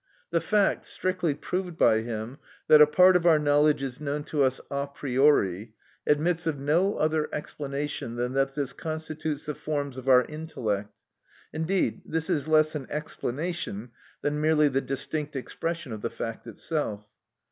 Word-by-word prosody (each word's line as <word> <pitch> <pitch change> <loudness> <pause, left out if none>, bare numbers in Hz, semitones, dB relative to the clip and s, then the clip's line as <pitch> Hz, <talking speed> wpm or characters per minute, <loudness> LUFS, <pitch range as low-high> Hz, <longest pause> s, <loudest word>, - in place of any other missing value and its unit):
The 170 -1 +2
fact, 210 -2 +1
strictly 180 -5 -1
proved 180 +1 -4
by 110 -7 +5
him, 115 +3 -5 0.3
that 155 -1 +8
a 150 - +9
part 180 +4 +6
of 175 -1 +3
our 160 -2 +7
knowledge 145 -1 +3
is 130 +1 -5
known 145 0 -2
to 145 0 -1
us 130 -1 +2
a 140 0 -1
priori, 125 -7 +1 0.3
admits 165 +3 +1
of 155 -3 0
no 165 +9 +2
other 155 0 +1
explanation 145 -4 -4
than 125 +1 -2
that 135 0 +1
this 140 -3 -2
constitutes 155 -1 -4
the 150 - -3
forms 145 -3 -3
of 130 +1 -4
our 125 -1 +6
intellect; 115 -10 -3 0.6
indeed, 160 +5 0
this 160 +2 -2
is 150 -4 0
less 155 0 +4
an 145 -4 -5
explanation 150 - -4 0.3
than 150 +1 0
merely 155 -1 +4
the 135 0 0
distinct 145 +2 -4
expression 165 +2 -4
of 110 -1 -5
the - - -2
fact 115 -1 -6
itself. 110 -10 -3
150 Hz, 160 wpm, -27 LUFS, 135-160 Hz, 0.6 s, a